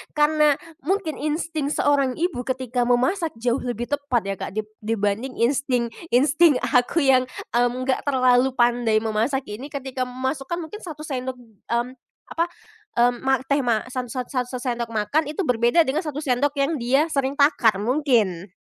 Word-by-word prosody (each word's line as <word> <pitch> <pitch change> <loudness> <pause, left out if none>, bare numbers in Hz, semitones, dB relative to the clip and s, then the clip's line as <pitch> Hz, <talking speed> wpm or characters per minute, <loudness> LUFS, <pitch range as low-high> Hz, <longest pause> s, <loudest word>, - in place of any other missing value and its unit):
karena 300 -1 +4 0.3
mungkin 345 -2 -1
insting 310 0 -2
seorang 285 -3 +1
ibu 340 -6 -1
ketika 255 -2 -1
memasak 315 +7 +1
jauh 235 +2 0
lebih 240 0 -4
tepat 285 -5 0
ya 195 0 -3
Kak - - -6
dib 215 0 -4
dibanding 220 +3 -1
insting 245 -1 +1 0.2
insting 290 +4 +5
aku 250 +6 +2
yang 260 -2 +4 0.2
mmm 245 +1 +2
enggak 260 +2 -1
terlalu 255 -1 +3
pandai 240 -3 +2
memasak 225 +5 0
ini 235 +7 -6
ketika 265 -3 -4
memasukkan 265 +5 -3
mungkin 370 +7 -8
1 310 -7 -8
sendok 260 -3 -4
mmm 235 +1 -4 0.4
apa, 335 +1 0 0.5
mmm 245 +1 +3
ma 265 - +5
teh 280 +2 +1
ma 235 -5 +1
sat 250 -1 -3
sat 250 +2 -3
sat 250 -2 -1
1 255 - -7
sendok 240 -2 -2
makan 230 +8 0
itu 310 +6 -2
berbeda 245 +3 +3
dengan 280 +1 -1
1 300 -3 -4
sendok 280 +1 +1
yang 280 +2 0
dia 270 +7 +2
sering 275 -1 0
takar 280 -7 +4
mungkin. 210 - +1
260 Hz, 165 wpm, -23 LUFS, 240-290 Hz, 0.5 s, insting